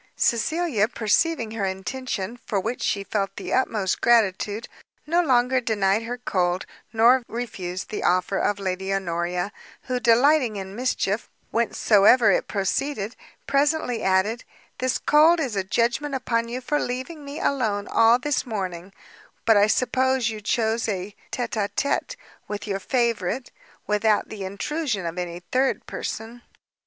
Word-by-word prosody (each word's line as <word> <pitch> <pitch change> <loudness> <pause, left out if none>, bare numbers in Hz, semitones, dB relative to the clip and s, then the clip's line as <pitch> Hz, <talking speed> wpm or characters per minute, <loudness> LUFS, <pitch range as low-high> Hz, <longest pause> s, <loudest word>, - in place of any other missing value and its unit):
Cecilia, 240 -2 +1
perceiving 230 +3 0
her 220 -2 -3
intention, 215 +3 -4
for 205 -4 -1
which 225 +6 -3
she 200 - 0
felt 195 -1 -2
the - - -5
utmost 215 -7 0
gratitude, 215 -1 +2 0.4
no 340 +3 +3
longer 255 -4 +3
denied 205 -3 +1
her 240 +2 -5
cold, 180 -6 0 0.3
nor 235 +3 +5
refused 190 -6 -5
the 215 - -3
offer 185 +2 +2
of 205 - +1
Lady 190 0 -3
Honoria; 180 0 -1 0.3
who, 250 0 -2
delighting 250 0 +4
in 195 0 -6
mischief, 230 -3 -1 0.2
whencesoever 220 -1 +4
it - - +1
proceeded, 210 +3 -2 0.3
presently 280 -4 +1
added, 195 +5 +1 0.4
"This 255 0 +1
cold 315 +3 +5
is 260 -9 -2
a 195 - 0
judgment 240 +8 0
upon 235 -3 -1
you 250 +2 -4
for 295 +4 0
leaving 260 +5 -4
me 285 +2 -7
alone 215 -7 0
all 230 +1 +5
this 280 +2 -1
morning; 190 -5 -5 0.5
but 225 - +5
I 205 0 +5
suppose 255 0 +1
you 215 -1 -7
chose 225 +2 0
a 195 0 -4 0.2
tête 245 -2 -3
à 200 - -1
tête 280 - -1 0.3
with 210 -1 -5
your 195 -2 -2
favourite, 235 0 -1 0.3
without 210 0 +1
the 205 -3 -6
intrusion 225 - -2
of 170 +2 -4
any 175 -1 -5
third 260 +1 +1
person." 230 +2 -6
225 Hz, 145 wpm, -24 LUFS, 195-255 Hz, 0.5 s, nor